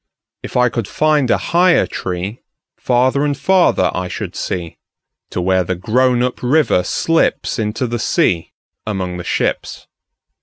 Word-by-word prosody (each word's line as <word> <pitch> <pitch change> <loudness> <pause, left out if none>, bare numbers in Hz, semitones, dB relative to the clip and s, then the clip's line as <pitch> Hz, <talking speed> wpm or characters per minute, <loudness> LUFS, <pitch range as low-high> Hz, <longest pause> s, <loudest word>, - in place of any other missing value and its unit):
If - - -5
I 125 0 +4
could 115 -3 -3
find 150 -4 +1
a - - +3
higher 175 0 +3
treeFarther 120 +7 -2
and 145 -2 0
farther 185 +5 +3
I 90 0 -3
should - - -6
see, 85 -3 -4 0.5
To - - -4
where 95 +1 +2
the 95 +2 -2
grown 120 +6 +1
up 125 0 -2
river 140 -4 +3
slipsInto 115 - 0
the 120 0 -3
sea 85 -5 0 0.4
among 95 -4 -3
the 90 - -6
ships. - - -2
120 Hz, 140 wpm, -17 LUFS, 95-140 Hz, 0.5 s, I